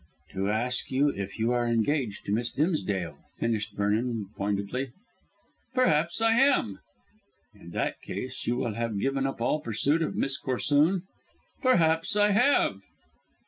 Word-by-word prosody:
"To 95 +1 -2
ask 120 +4 0
you 140 +3 +2
if 100 -6 -5
you 115 +2 +1
are 120 -1 +1
engaged 115 0 0
to - - -3
Miss 115 +3 0
Dimsdale," 100 - -1 0.2
finished 110 -2 -2
Vernon 105 +1 -1
pointedly. 105 +6 -2 0.8
"Perhaps 170 - +2
I 225 0 +4
am." 265 - +3 0.7
"In 100 -5 -14
that - - -2
case 130 0 -6
you 120 - +1
will 120 -4 -1
have 115 -1 -2
given 135 +5 0
up 135 - -5
all 120 +6 +1
pursuit 140 +8 +1
of 160 - -1
Miss 135 0 0
Corsoon?" 145 +7 +2 0.6
"Perhaps 165 - +3
I 205 0 +4
have." 250 +8 +3
125 Hz, 140 wpm, -28 LUFS, 105-155 Hz, 0.8 s, I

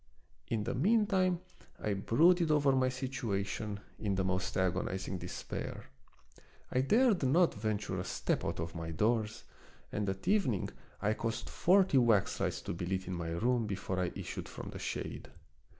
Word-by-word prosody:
In 110 -2 -1
the 115 - -2
mean 210 - +3
time 185 -4 +2 0.4
I 105 - -1
brooded 165 - +4
over 145 -2 +4
my 130 -1 +3
situation 110 -6 -3 0.2
in 100 -3 0
the 95 - +1
most 95 -1 -1
agonizing 95 0 -1
despair. 90 +1 -6 0.8
I 130 - +3
dared 220 - +4
not 160 +6 +4
ven 110 0 -1
ture 100 -3 -4
a - - -2
step - - -1
out - - -2
of 85 0 -3
my 85 -1 -5
doors, 110 +6 0 0.5
and 105 -1 -1
at 95 0 -5
evening 180 - +2 0.3
I 105 +1 +3
caused 115 0 -3
forty 185 -6 +4
waxlights 115 -5 +2
to - - -3
be 85 +1 -4
lit 95 0 -1
in 95 - -4
my 85 -2 -3
room 115 +7 +1
be 100 - -1
fore 95 0 -3
I 90 -1 0
issued - - -5
from - - -7
the - - -7
shade. - - -4
110 Hz, 170 wpm, -33 LUFS, 95-140 Hz, 0.8 s, brooded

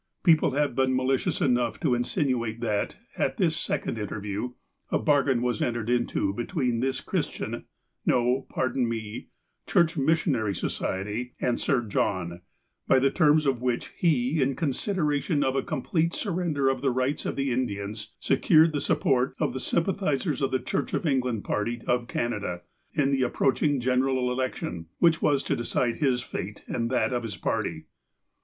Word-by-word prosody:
People 160 -6 +4
have 145 -1 +1
been 130 +1 +2
malicious 130 0 +1
enough 120 -2 +1
to 140 -6 +2
insinuate 120 -2 0
that, 105 -3 -1 0.2
at - - 0
this - - +2
second 115 - -2
interview, 105 +3 -4 0.4
a - - +3
bargain 140 -5 +2
was 120 -3 0
entered 120 -1 -1
into 120 -5 +1
be 120 - -3
tween 125 -9 0
this 130 +1 -1
Chi'istian - - -3 0.2
— - - -50
no, 125 +2 +2
pardon 130 -2 0
me 110 -2 -5 0.2
— - - -49
Church 170 -1 +3
Missionary 135 - +1
Society, 105 +8 -3
and 120 -1 0
Sir 125 -3 +1
John, 90 -5 -1 0.5
by - - +5
the 135 +1 +3
terms 155 -2 +4
of 135 -3 +1
which 125 -2 -1
he, 145 -3 +2
in 135 0 +1
con 150 -1 0
sideration 150 -3 0
of 130 0 0
a 135 - +2
complete 160 +3 -1
surrender 170 -8 0
of 135 -1 +1
the 135 - +2
rights 130 +3 0
of - - -2
the 135 -1 0
Indians, 105 -3 -3
secured 155 +4 +4
the 145 - -1
support 135 -4 +1
of - - 0
the 130 - -3
sympathizers 165 -4 0
of 135 - +2
the 130 - +1
Church 140 - -2
of - - -2
England 125 -7 0
party 115 +3 -1
of 120 -1 +1
Canada, 105 -8 -2 0.3
in 140 -3 +2
the 135 -1 +1
approaching 135 +2 +2
general 130 0 +1
election, 125 -10 -3
which 165 -1 +4
was 140 -2 +2
to - - 0
decide 120 0 0
his 130 -5 +1
fate, 105 -1 -6
and 115 -1 -1
that 130 0 +1
of 120 - 0
his 110 -4 -5
party. - - -2
130 Hz, 170 wpm, -27 LUFS, 120-145 Hz, 0.5 s, by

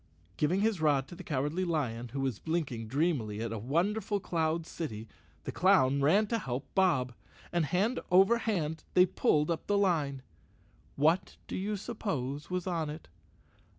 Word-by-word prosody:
Giving 175 +6 +1
his 215 -5 +1
rod 140 -4 +2
to - - -9
the 185 - -9
Cowardly 150 +4 -1
Lion, 130 -9 -1
who 135 +4 -4
was 130 -7 -1
blinking 145 -9 -2
dreamily 130 -6 0
at 115 0 -3
a 110 - -4
wonderful 190 - 0
cloud 165 -2 -1
city, 115 -11 -6 0.4
the - - -4
clown 140 -8 +4
ran 195 +10 +4
to 230 +2 -1
help 130 - -4
Bob, 155 -11 +2 0.4
and 175 -2 +1
hand 205 - +1
over 195 +6 +5
hand 160 -9 -2
they 180 - +7
pulled 150 -3 +1
up 165 - -3
the 205 - +2
line. 150 -9 +1 0.7
What 160 +6 +2
do - - -5
you 205 +2 -2
suppose 150 - -4
was 180 -1 -2
on 165 -5 -1
it? 155 - -8
160 Hz, 165 wpm, -31 LUFS, 135-185 Hz, 0.7 s, they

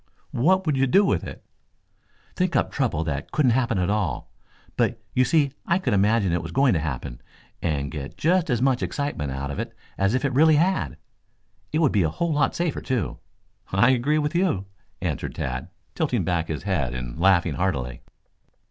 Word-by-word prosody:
"What 185 +9 +2
would 150 -4 +1
you 135 +1 +3
do 195 +10 +5
with - - +1
it?" - - -9 0.9
"Think 180 -1 0
up - - +2
trouble 115 - 0
that 70 -3 -4
couldn't 140 -5 +3
happen 115 -3 +1
at 90 +1 +1
all. 100 -12 -2 0.4
But - - +1
you 130 - +4
see 140 +2 +2
I 170 - +2
could 185 - -1
imagine 100 -2 +3
it 85 - 0
was 80 0 -7
going 135 -2 +3
to 80 - +1
happen, 65 -5 -5 0.4
and 70 -4 -1
get 70 -2 -7
just 175 +1 +2
as 120 -1 +1
much 130 -2 +2
excitement 140 - -2
out 70 +1 -4
of 70 - -5
it - - -5 0.2
as 95 +4 +2
if 130 - 0
it 135 - 0
really 155 +3 +5
had. 165 - +1 0.7
It 155 - 0
would 150 - +4
be 105 - +2
a 80 - +2
whole 170 - -1
lot 145 - +1
safer, 170 -3 -1
too." 130 -5 -2 0.5
"I 100 +7 +5
agree 130 +5 +2
with 150 0 0
you," 175 - +1 0.4
answered - - -3
Tad, 65 -1 -4 0.2
tilting - - 0
back 85 -3 0
his 80 - -4
head 75 -11 -1
and 60 +3 -6
laughing 95 -1 +4
heartily. 65 -10 -2
115 Hz, 190 wpm, -24 LUFS, -, 0.9 s, do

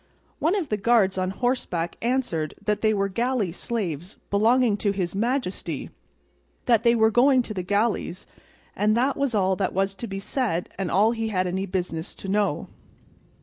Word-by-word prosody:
One 330 +6 +2
of 365 -8 -2
the 210 - 0
guards 200 -3 +3
on 185 0 0
horseback 195 -6 -1
answered 235 -11 -1
that 210 -1 0
they 215 - +3
were 200 -2 +1
galley 230 -1 0
slaves 180 -3 -4
belonging 225 +2 +4
to 205 - 0
his 185 -3 -2
majesty, 230 -1 -2 0.7
that 230 -3 +4
they 235 0 +4
were 220 -1 +4
going 255 +2 +4
to 215 - -5
the 190 - -3
galleys, 200 -1 -1 0.5
and 215 +2 +2
that 265 +3 +2
was 275 -4 0
all 190 -2 +2
that 195 - -1
was 195 +1 +1
to 230 +4 -6
be 195 -1 -5
said 195 -3 -2
and 190 -3 -1
all 210 +4 +4
he 225 -1 -2
had 185 -4 0
any 190 +2 -2
business 180 -3 -3
to - - -8
know. 200 -4 0
210 Hz, 180 wpm, -25 LUFS, 190-235 Hz, 0.7 s, belonging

